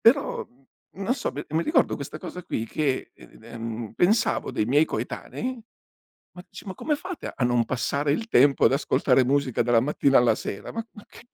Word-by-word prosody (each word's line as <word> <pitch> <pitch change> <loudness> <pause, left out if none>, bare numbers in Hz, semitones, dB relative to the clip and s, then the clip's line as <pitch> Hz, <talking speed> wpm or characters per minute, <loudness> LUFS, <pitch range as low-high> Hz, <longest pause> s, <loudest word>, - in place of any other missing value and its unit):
Però, 275 +5 +3 0.5
non 200 +6 0
so 250 - -3
mi 145 +3 -5
mi 160 +2 +1
ricordo 310 - +2
questa - - -7
cosa 180 - -7
qui 115 - -3
che, 140 +1 -2
ehm, 115 -1 -8
pensavo 205 - +2
dei 105 - 0
miei 145 +7 +4
coetanei: 230 - -5 0.7
"Ma 180 - -10
c 190 - -10
ma 190 - -5
come 300 - -1
fate 365 +3 -6
a - - -2
non 120 -1 +2
passare 140 +5 -1
il 220 +10 -1
tempo 140 - +4
ad - - +5
ascoltare 135 -2 +3
musica, 135 -2 +1
dalla 120 0 +4
mattina 140 +1 +3
alla 120 -3 +4
sera? 100 - -6
Ma 225 0 -4
ma 210 - -13
ch - - -15
140 Hz, 185 wpm, -25 LUFS, 120-200 Hz, 0.7 s, ad